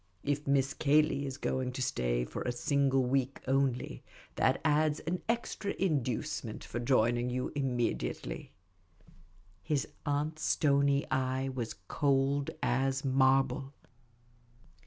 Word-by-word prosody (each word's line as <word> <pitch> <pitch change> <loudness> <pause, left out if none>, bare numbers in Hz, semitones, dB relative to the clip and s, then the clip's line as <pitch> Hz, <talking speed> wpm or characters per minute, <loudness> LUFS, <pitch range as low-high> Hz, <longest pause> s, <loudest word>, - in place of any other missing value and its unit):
If 145 0 -1
Miss 140 -1 +2
Cayley 145 -1 +2
is 135 0 -5
going 130 -2 -2
to 130 - -4
stay - - 0
for - - -6
a 125 - -1
single 135 +1 +2
week 130 +1 0
only, 135 -2 0 0.3
that - - +2
adds 150 0 +3
one 180 +2 -1
extra 230 -3 -1
inducement 130 - -1
for 120 - -5
joining 120 0 +2
you 125 +1 -2
immediately." 120 - -2 1.1
His 150 -4 -1 0.2
aunt's 150 +1 -1
stony 140 -1 +3
eye 130 0 0
was 125 -4 -4
cold 140 0 +1
as 135 +2 +1
marble. 135 +1 +2
135 Hz, 115 wpm, -31 LUFS, 125-145 Hz, 1.1 s, adds